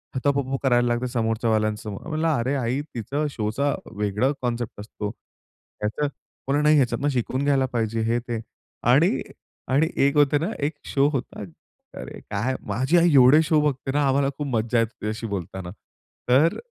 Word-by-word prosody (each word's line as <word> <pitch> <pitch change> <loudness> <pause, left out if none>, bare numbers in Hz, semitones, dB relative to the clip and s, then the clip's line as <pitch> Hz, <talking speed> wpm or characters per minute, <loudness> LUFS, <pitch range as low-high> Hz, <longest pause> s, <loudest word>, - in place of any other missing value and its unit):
त - - 0
त - - +4
प - - +2
प - - +1
करायला 120 -2 +3
लागते 120 +1 0
समोरच्यावाल्यां 110 -2 0
समोर." 105 +2 -8
म्हटलं, 160 0 -1
"अरे 135 -2 0
आई 130 +1 -1
तिचा 140 +7 -2
शोचा 130 +5 -1 0.2
वेगळा 105 +6 +1
कॉन्सेप्ट 120 -3 -3
असतो. 105 0 -5
ह्याचं" 110 +4 -6 0.4
बोलली, 145 +2 +2
"नाही, 150 +1 +5
ह्याच्यातनं 140 +2 +1
शिकून 130 0 -1
घ्यायला 140 -2 +3
पाहिजे," 115 -1 -1
हे 115 +2 +1
ते, 120 -2 -4 0.4
आणि - - +4 0.5
आणि 145 +5 +3 0.2
एक 140 - +2
होते 145 0 +4
ना 165 - -1
एक 145 +2 -1
शो 140 0 +2
होता. 135 -7 -4 0.6
अरे - - -8
काय 120 +6 -1
माझी 130 +11 +2
आई 170 -1 +4
एवढे 135 +3 +7
शो 155 0 +3
बघते 135 -2 -1
ना 145 +2 +1
आम्हाला 135 +1 +2
खूप 145 - -3
मज्जा 115 +1 +1
येते 115 -1 +1
तिच्याशी 110 +2 -3
बोलताना. 95 -2 -5 0.6
तर 145 +7 +4
125 Hz, 170 wpm, -24 LUFS, 110-140 Hz, 0.6 s, एवढे